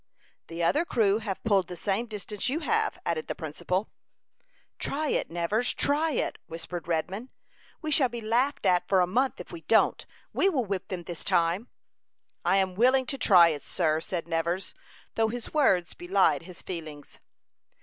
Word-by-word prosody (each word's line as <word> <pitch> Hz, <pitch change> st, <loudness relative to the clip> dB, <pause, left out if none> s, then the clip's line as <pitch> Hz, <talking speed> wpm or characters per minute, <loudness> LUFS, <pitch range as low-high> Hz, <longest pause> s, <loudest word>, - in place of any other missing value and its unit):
"The 165 Hz, +1 st, -4 dB
other 290 Hz, -, +3 dB
crew 215 Hz, -, +2 dB
have 205 Hz, -4 st, -5 dB
pulled 195 Hz, -5 st, +2 dB
the 180 Hz, -, -7 dB
same 205 Hz, +6 st, -1 dB
distance 210 Hz, +1 st, -3 dB
you 305 Hz, +6 st, -1 dB
have," 440 Hz, +5 st, 0 dB
added 165 Hz, -2 st, -1 dB
the -, -, -3 dB
principal. 180 Hz, +6 st, -3 dB, 0.9 s
"Try 300 Hz, +1 st, -2 dB
it, -, -, 0 dB
Nevers, 175 Hz, +8 st, 0 dB
try 300 Hz, +2 st, +1 dB
it," -, -, -2 dB
whispered 165 Hz, +1 st, -6 dB
Redman. 185 Hz, +9 st, -2 dB, 0.5 s
"We 310 Hz, -, -2 dB
shall 275 Hz, -4 st, +4 dB
be 235 Hz, -, -5 dB
laughed 235 Hz, +4 st, 0 dB
at 180 Hz, -1 st, +3 dB
for 190 Hz, -2 st, +4 dB
a -, -, +4 dB
month, 250 Hz, +9 st, 0 dB
if 180 Hz, -, -9 dB
we 170 Hz, -, -8 dB
don't. 220 Hz, +7 st, +3 dB, 0.3 s
We 390 Hz, -, +3 dB
will 265 Hz, -10 st, 0 dB
whip 195 Hz, -2 st, -3 dB
them 180 Hz, -2 st, -5 dB
this 170 Hz, 0 st, -7 dB
time." 170 Hz, +7 st, +1 dB, 0.8 s
"I 195 Hz, -, +3 dB
am 190 Hz, -1 st, +1 dB
willing 255 Hz, +6 st, +4 dB
to 275 Hz, -, -4 dB
try 175 Hz, -7 st, +7 dB
it, 150 Hz, -3 st, -3 dB
sir," 160 Hz, -3 st, 0 dB
said 175 Hz, -2 st, -4 dB
Nevers, 170 Hz, +3 st, -1 dB, 0.4 s
though 225 Hz, 0 st, +2 dB
his 240 Hz, +1 st, -5 dB
words 190 Hz, -, +3 dB
belied 190 Hz, +2 st, +2 dB
his 175 Hz, +1 st, -12 dB
feelings. 155 Hz, -5 st, -8 dB
195 Hz, 175 wpm, -28 LUFS, 170-245 Hz, 0.9 s, try